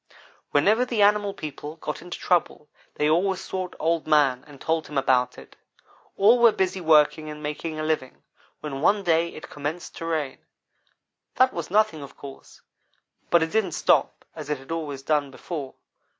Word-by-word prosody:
"Whenever 210 Hz, +12 st, +3 dB
the 235 Hz, -4 st, +1 dB
animal 205 Hz, 0 st, +3 dB
people 150 Hz, -3 st, -7 dB
got 150 Hz, -2 st, -6 dB
into 175 Hz, 0 st, -7 dB
trouble 175 Hz, -4 st, 0 dB, 0.3 s
they 150 Hz, -, +1 dB
always 185 Hz, +4 st, +2 dB
sought 185 Hz, -1 st, -5 dB
Old 165 Hz, 0 st, 0 dB
man 140 Hz, -5 st, +3 dB
and 145 Hz, -2 st, -14 dB
told 160 Hz, +2 st, -1 dB
him 150 Hz, -, -5 dB
about 125 Hz, -2 st, +2 dB
it. -, -, -14 dB, 0.6 s
All 220 Hz, +5 st, +6 dB
were 235 Hz, -1 st, +7 dB
busy 190 Hz, -2 st, -1 dB
working 155 Hz, -1 st, +4 dB
and 150 Hz, 0 st, -8 dB
making 155 Hz, +1 st, -4 dB
a -, -, -2 dB
living, 155 Hz, -5 st, -2 dB, 0.4 s
when 140 Hz, -3 st, -5 dB
one 200 Hz, +5 st, +3 dB
day 170 Hz, -1 st, +2 dB
it 155 Hz, -, -10 dB
commenced 150 Hz, +4 st, -5 dB
to 165 Hz, -, -5 dB
rain. 155 Hz, -5 st, -2 dB, 1.0 s
That 255 Hz, 0 st, +4 dB
was 170 Hz, -, -5 dB
nothing, 205 Hz, -5 st, +2 dB
of 140 Hz, -, -11 dB
course, 140 Hz, -1 st, -12 dB, 0.7 s
but 170 Hz, -1 st, +4 dB
it 160 Hz, -, -3 dB
didn't 210 Hz, -6 st, 0 dB
stop -, -, +1 dB
as 155 Hz, -2 st, -8 dB
it 150 Hz, -, 0 dB
had 135 Hz, +4 st, -12 dB
always 150 Hz, -5 st, -4 dB
done 145 Hz, -1 st, +1 dB
before. 140 Hz, 0 st, -7 dB
160 Hz, 175 wpm, -25 LUFS, 145-185 Hz, 1.0 s, were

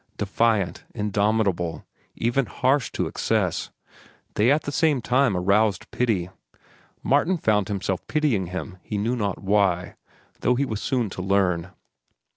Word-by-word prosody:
Defiant, 105 Hz, -3 st, 0 dB
indomitable, 105 Hz, -4 st, 0 dB, 0.3 s
even 120 Hz, +2 st, 0 dB
harsh 135 Hz, 0 st, +1 dB
to -, -, -1 dB
excess, -, -, -1 dB, 0.6 s
they 110 Hz, +4 st, +3 dB
at 150 Hz, +2 st, +2 dB
the 145 Hz, -, -4 dB
same 150 Hz, -2 st, +2 dB
time 125 Hz, -3 st, +2 dB
aroused 100 Hz, +2 st, +1 dB
pity. 100 Hz, -8 st, 0 dB, 0.7 s
Martin 155 Hz, +7 st, +2 dB
found 105 Hz, -, +1 dB
himself 95 Hz, -2 st, -3 dB
pitying 140 Hz, -, +1 dB
him 95 Hz, +2 st, -6 dB
he 105 Hz, -, -4 dB
knew 115 Hz, +5 st, 0 dB
not 100 Hz, -6 st, -2 dB
why, 95 Hz, -3 st, +1 dB, 0.5 s
though 125 Hz, -, +2 dB
he 140 Hz, +3 st, +1 dB
was 110 Hz, -5 st, -4 dB
soon 125 Hz, -7 st, -1 dB
to 90 Hz, -, -5 dB
learn. 90 Hz, -3 st, +1 dB
105 Hz, 135 wpm, -24 LUFS, 95-125 Hz, 0.7 s, they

